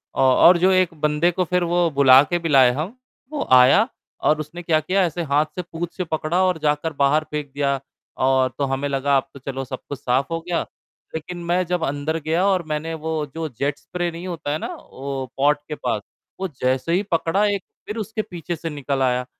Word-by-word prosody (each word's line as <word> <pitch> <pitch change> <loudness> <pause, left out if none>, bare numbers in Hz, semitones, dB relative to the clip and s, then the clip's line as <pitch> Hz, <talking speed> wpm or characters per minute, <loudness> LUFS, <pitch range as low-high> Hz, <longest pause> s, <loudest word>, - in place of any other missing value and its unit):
अ, - - -4
और 135 +7 +6
जो 185 +2 +4
1 185 -2 +3
बंदे 150 +3 +2
को 185 +2 0
फिर 180 +1 +1
वो 175 0 +2
बुला 135 -2 +7
के 175 +3 -1
भी 165 - -3
लाए 130 -4 +6
हम, 165 - -4 0.3
वो 300 - -3
आया 130 - +7 0.4
और 155 0 +3
उसने 155 +3 -6
क्या 160 -2 +3
किया 190 +4 +1
ऐसे 170 +1 -3
हाथ 150 +1 +2
से 180 - -2
पूंछ 170 0 -5
से 185 - -1
पकड़ा 160 +2 -1
और 185 -2 +2
जाकर 150 +1 0
बाहर 145 +3 +3
फेंक 150 -2 -4
दिया 140 -1 0 0.5
और 130 -1 +3
तो 140 - +1
हमें 135 +1 -1
लगा 140 0 +2
अब 135 - -2
तो 140 - -11
चलो 135 0 -5
सब 130 0 -6
कुछ 145 - -5
साफ 130 +5 0
हो 165 - -1
गया, 170 0 -1 0.5
लेकिन 175 +2 -6
मैं 180 +1 +1
जब 175 -1 -1
अंदर 145 +3 -2
गया 165 +5 0
और 190 -3 +2
मैंने 155 +2 -3
वो 160 -1 -2
जो 165 -1 -2
जेट 140 +3 -2
स्प्रे 175 -1 -3
नहीं 170 +2 -7
होता 165 -5 -4
है 150 - 0
ना - - -5
वो 135 0 -6
पॉट 145 +2 +3
के 150 - -4
पास, 120 -7 -2 0.4
वो 190 - -1
जैसे 130 +6 +1
ही 190 +3 +2
पकड़ा 170 +5 +2
एक 195 - -6 0.2
फिर 210 - -5
उसके 220 0 -3
पीछे 175 -3 -6
से 165 0 -5
निकल 140 -2 -3
आया। 125 -1 +1
155 Hz, 225 wpm, -22 LUFS, 140-175 Hz, 0.5 s, बुला